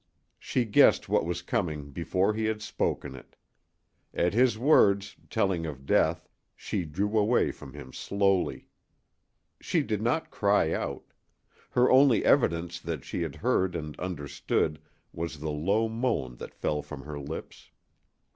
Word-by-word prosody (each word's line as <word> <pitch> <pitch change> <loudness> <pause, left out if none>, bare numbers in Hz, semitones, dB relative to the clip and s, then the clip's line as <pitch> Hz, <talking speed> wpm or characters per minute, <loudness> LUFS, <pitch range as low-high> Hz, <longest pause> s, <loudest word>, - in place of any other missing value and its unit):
She 125 - -1
guessed 105 - +4
what - - +2
was 90 0 -3
coming 75 -6 -2
before 90 +6 0
he 110 +1 -1
had 110 0 -1
spoken 85 - -2
it. 65 - -14 0.8
At 90 +1 +1
his 120 -1 +3
words, 100 -7 +4
telling 90 -4 0
of 70 -3 -8
death, - - +2 0.3
she 90 - -3
drew 100 +8 -2
away 110 +4 +2
from - - -12
him 65 0 -10
slowly. 100 -2 0 0.9
She - - 0
did - - -2
not - - 0
cry - - +2
out. - - -3 0.7
Her 125 +1 +3
only 130 -3 +5
evidence 85 - +2
that 80 -5 -5
she - - -4
had - - -3
heard 95 -2 +2
and 75 -3 -5
understood 75 -2 -2 0.3
was 85 -2 -4
the 75 +1 -4
low 100 +10 +1
moan 110 - -2
that - - -9
fell 75 -1 -1
from 75 -1 -9
her 75 -1 -6
lips. 70 - -8
90 Hz, 145 wpm, -28 LUFS, 75-105 Hz, 0.9 s, only